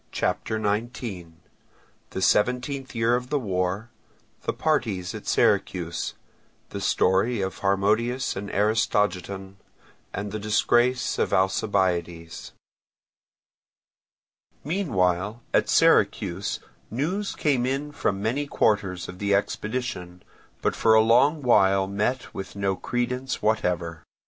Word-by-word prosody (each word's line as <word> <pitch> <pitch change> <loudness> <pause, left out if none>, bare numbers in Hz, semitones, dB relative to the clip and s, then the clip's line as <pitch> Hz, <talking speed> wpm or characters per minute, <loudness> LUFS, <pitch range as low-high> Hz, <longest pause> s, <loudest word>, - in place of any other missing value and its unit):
CHAPTER 110 - -1
XIX 105 -3 -3 1.0
Seventeenth 125 +4 +1
Year 115 +1 +3
of 125 +1 -3
the 150 - +1
War—Parties 100 - -3
at - - -8
Syracuse—Story 95 +4 0
of 95 0 -3
Harmodius 105 +6 +1
and 100 +1 -5
Aristogiton—Disgrace 105 +3 -1
of - - +1
Alcibiades 90 -3 0 2.1
Meanwhile 110 - 0
at - - +3
Syracuse 90 +3 +2 0.3
news 175 - -2
came 130 -5 +1
in 140 +3 -2
from 100 -8 -1
many 135 +7 -1
quarters 95 -8 0
of 90 0 -9
the 100 -1 +2
expedition, 100 -4 -3 0.4
but - - +1
for 110 -1 +4
a 110 - +7
long 130 +7 +4
while 95 -5 +4
met 105 +6 -2
with 95 0 -7
no 100 -1 0
credence 125 +4 -3
whatever. 90 -6 0
105 Hz, 90 wpm, -25 LUFS, 95-125 Hz, 2.1 s, a